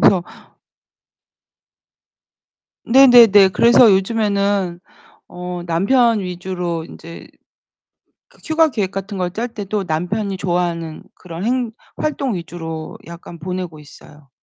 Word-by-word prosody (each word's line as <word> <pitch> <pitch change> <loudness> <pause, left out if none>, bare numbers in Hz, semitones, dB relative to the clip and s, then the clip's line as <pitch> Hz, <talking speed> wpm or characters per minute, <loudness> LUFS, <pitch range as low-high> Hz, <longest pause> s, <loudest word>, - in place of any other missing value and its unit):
그래서 185 -3 +4 2.6
네네네. 235 -6 +7
그래서 235 +3 +5
요즘에는 200 -2 0 0.5
어 180 0 -7
남편 225 +7 +2
위주로 180 -2 -4
인제 165 0 -12 1.0
그 - - -25
휴가 320 0 +3
계획 205 -8 -2
같은 195 +1 -6
걸 180 -1 -2
짤 225 +6 -3
때도 210 -2 -4
남편이 190 +5 -2
좋아하는 175 -3 -3
그런 175 0 -9
행 245 -1 -1 0.3
활동 280 -6 -2
위주로 165 -2 -7
약간 170 0 -11
보내고 180 -2 -5
있어요. 150 -1 -17
190 Hz, 230 characters per minute, -18 LUFS, 170-220 Hz, 2.6 s, 네네네